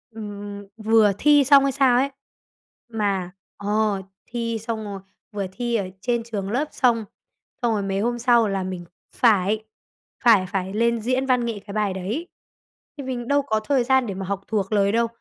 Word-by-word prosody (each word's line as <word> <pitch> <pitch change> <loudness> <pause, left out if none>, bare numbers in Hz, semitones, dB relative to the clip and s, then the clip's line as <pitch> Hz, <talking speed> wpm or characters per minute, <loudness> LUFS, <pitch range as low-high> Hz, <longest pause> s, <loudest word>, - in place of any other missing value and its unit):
ừm, 205 -1 -7
vừa 220 -1 +4
thi 290 +2 +5
xong 275 0 +6
hay 275 - +2
sao 260 -2 +4
ấy, 275 +2 +2 0.8
mà 200 -5 -1 0.3
ờ, 205 -1 0 0.3
thi 230 -1 -2
xong 225 0 -4
rồi, 200 -1 -6 0.3
vừa 205 -2 -3
thi 240 +3 -2
ở 195 -4 -1
trên 235 +1 0
trường 205 -4 -4
lớp 275 +6 0
xong, 230 -4 +2 0.6
xong 235 -2 +2
rồi 210 - 0
mấy 195 0 -1
hôm 240 +3 -1
sau 235 -2 +4
là 195 -1 -1
mình 185 -2 -5 0.3
phải 215 -2 +3 0.6
phải 220 -6 +6
phải 190 +1 -3
lên 235 +1 +1
diễn 255 +4 0
văn 250 -2 +2
nghệ 225 -3 -3
cái 200 - -8
bài 210 -3 0
đấy. 215 - -4 0.7
Thì 280 - -5
mình 250 -2 -4
đâu 285 0 +3
có 220 -6 0
thời 260 +3 +1
gian 260 -1 +2
để 195 - -3
mà 190 0 -5
học 200 0 -3
thuộc 205 -3 -1
lời 200 -1 +3
đâu, 230 +1 +2
220 Hz, 190 wpm, -23 LUFS, 200-245 Hz, 0.8 s, xong